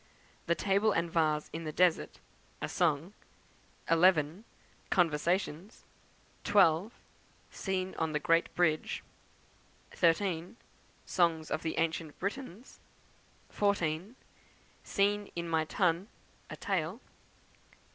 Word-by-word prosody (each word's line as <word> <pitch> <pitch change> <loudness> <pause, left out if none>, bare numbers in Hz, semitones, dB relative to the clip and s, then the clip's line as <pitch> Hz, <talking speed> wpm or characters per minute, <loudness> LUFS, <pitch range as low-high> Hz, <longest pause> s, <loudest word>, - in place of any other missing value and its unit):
The 170 - +3
Table 200 +3 +2
and 165 -2 0
Vase 155 -3 +1
in 165 +1 -4
the 155 - -4
Desert, 175 +1 +1 0.4
a - - -3
Song; 165 +2 0 0.7
11. 165 +2 +3 0.4
Conversations; 175 +3 0 0.6
12. 200 0 +4 0.6
Scene 190 -1 -3
on 160 -1 0
the 150 - 0
Great 165 +2 +2
Bridge; 160 -3 +1 0.9
13. 175 +3 +1 0.5
Song 165 -3 +1
of - - -1
the 160 - -3
Ancient 160 -2 -1
Britons; 225 +2 -6 0.7
14. 195 0 0 0.7
Scene 205 +1 0
in 170 0 -3
my 160 -1 +1
Tun, 180 +2 +1 0.4
a - - -6
Tale; 180 -5 -1
15. - - -28
170 Hz, 105 wpm, -31 LUFS, 160-195 Hz, 0.9 s, 12